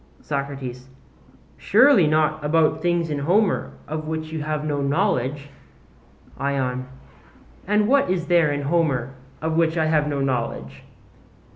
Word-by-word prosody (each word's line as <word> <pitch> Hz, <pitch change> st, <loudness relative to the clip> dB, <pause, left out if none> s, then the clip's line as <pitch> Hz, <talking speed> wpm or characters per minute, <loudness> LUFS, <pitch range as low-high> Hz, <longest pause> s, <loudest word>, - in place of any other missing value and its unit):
SOCRATES: 135 Hz, -3 st, -5 dB, 0.7 s
Surely 220 Hz, -, +5 dB
not 155 Hz, 0 st, +1 dB
about 155 Hz, +1 st, +2 dB
things 175 Hz, -2 st, 0 dB
in 145 Hz, -, -2 dB
Homer 190 Hz, +8 st, +1 dB
of 155 Hz, +1 st, -5 dB
which 160 Hz, 0 st, -4 dB
you 160 Hz, -1 st, -4 dB
have 150 Hz, 0 st, -3 dB
no 145 Hz, -2 st, -1 dB
knowledge? 145 Hz, -3 st, -1 dB, 0.9 s
ION: 130 Hz, -2 st, -2 dB, 0.8 s
And 210 Hz, +1 st, +2 dB
what 275 Hz, -3 st, +3 dB
is 180 Hz, -2 st, -1 dB
there 170 Hz, -4 st, +3 dB
in 145 Hz, 0 st, -2 dB
Homer 140 Hz, -5 st, 0 dB, 0.3 s
of 160 Hz, 0 st, -1 dB
which 165 Hz, 0 st, +1 dB
I 160 Hz, -, +2 dB
have 155 Hz, -1 st, +2 dB
no 145 Hz, -1 st, -2 dB
knowledge? 115 Hz, -, -3 dB
155 Hz, 135 wpm, -22 LUFS, 140-165 Hz, 0.9 s, Surely